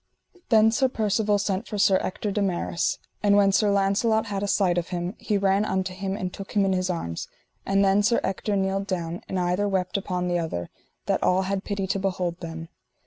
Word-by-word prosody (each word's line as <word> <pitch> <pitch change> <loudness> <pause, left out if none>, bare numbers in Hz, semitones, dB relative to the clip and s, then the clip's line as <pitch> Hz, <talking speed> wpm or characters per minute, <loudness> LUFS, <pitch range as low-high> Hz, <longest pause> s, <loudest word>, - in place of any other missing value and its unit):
Then 220 -1 +5
Sir 260 +3 +2
Percivale 215 -2 +1
sent 195 -1 -2
for 210 - -4
Sir 195 -1 +4
Ector 205 +2 -3
de 205 - -1
Maris, 180 -3 0 0.2
and 205 -1 +4
when 200 -1 +5
Sir 205 +1 +3
Launcelot 200 +3 +2
had 200 -2 -3
a 205 - -1
sight 185 -3 +2
of 170 - -5
him, 175 0 -3
he 210 - 0
ran 195 +1 +2
unto 190 -2 -1
him 195 +1 -3
and 185 -2 -4
took 195 - -8
him 200 -2 +3
in 190 - +2
his 185 0 0
arms; 85 - -3 0.4
and 195 0 +3
then 195 +1 +4
Sir 230 +3 +3
Ector 200 +2 -1
kneeled 195 0 0
down, 175 -2 -3
and 190 - -1
either 180 +3 +1
wept 190 -1 -1
upon 180 -2 -2
other, 160 - -3 0.3
that - - 0
all 185 +1 +3
had 195 +1 -2
pity 200 -2 -2
to 195 +1 -1
behold 185 -2 -2
them. 165 -1 -7
195 Hz, 210 wpm, -25 LUFS, 180-205 Hz, 0.4 s, Then